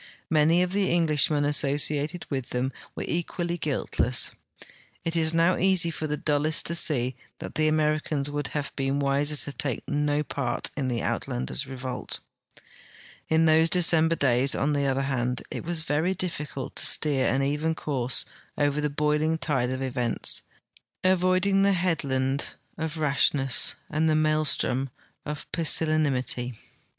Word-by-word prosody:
Many 160 +3 +4
of 180 - -2
the 195 0 +1
Englishmen 150 -3 +3
asso 145 -1 +2
ciated 150 +3 -1
with 130 -3 -3
them 125 +2 -2 0.2
were - - -4
equally 175 0 -2
guiltle.ss. 130 -5 0 0.7
It 165 0 -1
is 160 -1 +2
now 165 +2 +3
easy 185 -2 +4
for 155 0 -4
the 150 0 -2
dullest 150 +1 +2
to 170 - +1
see 130 -6 +1 0.2
that - - -8
the 155 0 +1
Americans 155 -2 0
would 145 -1 -3
have 145 -1 -4
l>een 135 0 0
wiser 140 +2 +1
to 145 - -5
take 130 -2 -3
no 145 0 0
part 125 -4 -3
in 140 -3 -2
the 120 -2 -1
Uitlanders' 65 +1 -3
revolt. 130 -1 -5 1.1
In 160 +1 +3
those 160 +1 +4
Decemljer 165 -1 +3
days, 130 0 +3
on 150 +2 0
tlie 140 -1 +1
other 135 +1 0
hand, 125 -2 -2
it - - -5
was 170 -1 -2
very 160 +4 0
diflicult 150 -6 -5
to - - +2
steer 140 -4 +2
an 135 +3 +1
even 150 +3 0
course 130 -5 0 0.3
over 145 0 +1
the 150 - 0
boiling 150 +2 0
tide 130 -4 0
of 130 +1 -3
events, 125 -3 -1 0.6
avoiding 185 +1 +3
the 200 0 +4
headland 140 -7 -1 0.2
of 160 -1 -4
Rashness 140 -3 +2
and 155 +1 0
the 155 - +2
maelstrom 155 -4 +1 0.4
of 150 -1 -5
Pusillanimity. 145 -7 0
150 Hz, 150 wpm, -26 LUFS, 135-160 Hz, 1.1 s, Many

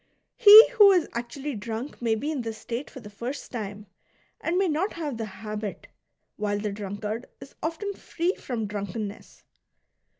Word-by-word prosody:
He 430 0 +11
who 420 -5 +7
is 360 -4 +3
actually 265 +5 -4
drunk 225 +5 -6
may 230 -2 +2
be 290 +8 -3
in 290 -5 -2
this 225 -2 -5
state 235 +5 -5
for - - -10
the 210 - -10
first 245 +7 -6
time 210 -3 -6 0.5
and 340 +2 -1
may 385 0 +3
not 340 +6 0
have 305 -6 -4
the 225 - -3
habit, 210 +1 -6 0.5
while 205 -1 -1
the 205 0 -3
drunkard 210 +3 -5
is 275 - -12
often 370 +6 -3
free 350 -1 -2
from 235 - -4
drunkenness. 205 +1 -6
235 Hz, 165 wpm, -26 LUFS, 210-315 Hz, 0.5 s, He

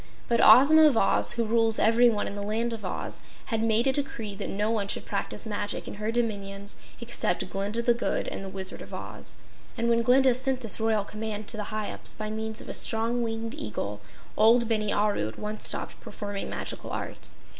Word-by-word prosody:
But 235 -1 +2
Ozma 310 +5 +8
of 270 -6 +2
Oz, 195 - +4
who 235 -1 -1
rules 225 0 +2
everyone 230 -1 +3
in - - -5
the 205 - -5
Land 225 +3 -1
of 220 -2 -7
Oz, 185 - -4 0.3
had 220 - 0
made 225 +1 +2
a 270 - +4
decree 265 -7 -3
that 200 +1 -5
no 210 +3 -1
one 210 -3 -1
should - - -2
practice - - -4
magic 205 -1 -4
in - - -6
her 215 +1 -1
dominions 200 -4 -3 0.2
except 235 -7 -1
Glinda 205 +5 -1
the 240 - +4
Good 235 - -2
and - - -4
the 195 - -6
Wizard 190 0 -3
of - - -8
Oz, - - -9 0.4
and 235 0 0
when 235 0 +3
Glinda 255 +2 +4
sent 260 +1 -1
this 225 -2 +3
royal 220 -2 +1
command 215 0 -5
to 220 - -1
the 210 - -3
Hyups 215 -1 -2
by 215 0 -5
means 220 0 -3
of - - -11
a - - -5
strong 230 +2 +3
winged 225 0 -3
Eagle, 105 -1 -4 0.3
old 230 +2 +4
Bini 215 -2 0
Aru 205 - 0
at 110 - -9
once 210 +1 0
stopped - - -1
performing 205 -1 -6
magical - - -5
arts. - - -4
220 Hz, 205 wpm, -27 LUFS, 205-235 Hz, 0.4 s, Ozma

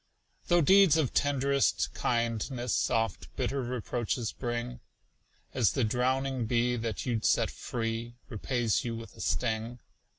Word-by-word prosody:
Though 175 0 +4
deeds 190 -1 +6
of 150 -6 0
tend'rest 140 -1 +1
kindness 120 +1 -1
Oft 115 -3 -1
bitter 140 0 -1
reproaches 120 -1 -2
bring, 120 0 -4 0.7
As 120 -6 +2
the 130 - +1
drowning 130 +2 0
bee 120 +1 +2
that 115 -2 -3
you'd 115 -4 -1
set - - +2
free 115 0 -4
Repays 120 -1 -1
you 115 -1 -3
with 115 0 -9
a - - -9
sting. 115 0 -1
120 Hz, 130 wpm, -30 LUFS, 115-130 Hz, 0.7 s, deeds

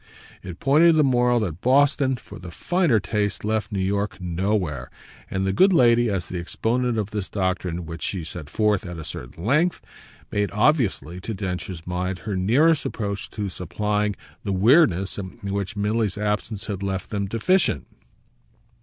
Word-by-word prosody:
It 90 -2 -8
pointed 155 +4 +5
the 155 - +5
moral 125 -2 +3
that 90 -4 -3
Boston, 135 +1 +3
for 125 - -11
the 90 - -9
finer 170 - +1
taste, 105 +1 -2
left 110 0 -1
New 100 - -2
York 100 +2 -1
nowhere; 90 - -1 0.4
and 95 0 -1
the 95 - 0
good 190 - +5
lady, 120 -7 +4
as 95 -4 -1
the 90 - -4
exponent 115 +7 -1
of 105 -1 -2
this 105 -3 -3
doctrine 90 -3 -2
which 80 0 -7
she 95 -4 -2
set 80 -2 -7
forth 105 0 +1
at 90 -3 -7
a 80 - -7
certain 65 +7 -8
length 155 +9 +2 0.5
made, 105 0 0
obviously, 105 - +1
to 110 +2 -4
Densher's 90 -3 -5
mind, 90 +1 -2
her 105 -3 -2
nearest 140 - +3
approach 100 -3 -4
to 105 -2 -4
supplying 105 +4 -1 0.3
the 100 - -2
weirdness 100 - +4
in 95 +1 -7 0.2
which 100 +1 -3
Milly's 105 0 0
absence 105 0 -2
had 100 -2 -4
left 95 -1 -3
them 100 -2 -1
deficient. 115 - +1
105 Hz, 165 wpm, -24 LUFS, 90-115 Hz, 0.5 s, pointed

